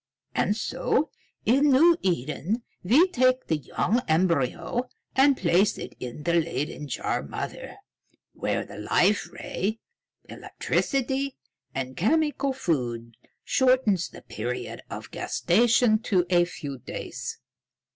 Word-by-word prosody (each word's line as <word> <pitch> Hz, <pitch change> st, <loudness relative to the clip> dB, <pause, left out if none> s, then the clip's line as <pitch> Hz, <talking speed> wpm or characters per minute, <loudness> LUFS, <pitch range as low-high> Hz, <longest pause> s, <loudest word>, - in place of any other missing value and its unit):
And 210 Hz, -, +1 dB
so, -, -, 0 dB, 0.3 s
in 275 Hz, +6 st, +4 dB
New 325 Hz, +6 st, +6 dB
Eden, 175 Hz, -, -1 dB, 0.2 s
we 265 Hz, -, +5 dB
take 255 Hz, -3 st, +2 dB
the 160 Hz, -, +1 dB
young 180 Hz, -, 0 dB
embryo 170 Hz, -, +1 dB, 0.3 s
and 275 Hz, 0 st, +5 dB
place 185 Hz, +3 st, +3 dB
it -, -, -7 dB
in 125 Hz, +4 st, -7 dB
the 170 Hz, -, +1 dB
Leyden 155 Hz, -2 st, -1 dB
jar -, -, -2 dB
mother, -, -, -6 dB, 0.6 s
where -, -, -2 dB
the 100 Hz, -, -10 dB
Life 185 Hz, -, +2 dB
Ray, 210 Hz, +5 st, -3 dB, 0.5 s
electricity, 270 Hz, +1 st, -1 dB, 0.4 s
and 130 Hz, -1 st, -3 dB
chemical 285 Hz, -, +1 dB
food 120 Hz, -, -2 dB, 0.3 s
shortens 255 Hz, -9 st, +2 dB
the -, -, -13 dB
period 125 Hz, 0 st, -5 dB
of -, -, -7 dB
gestation 225 Hz, +3 st, +3 dB
to 190 Hz, -6 st, +1 dB
a 175 Hz, -1 st, +5 dB
few 145 Hz, -6 st, -7 dB
days." -, -, -6 dB
195 Hz, 115 wpm, -26 LUFS, 155-255 Hz, 0.6 s, New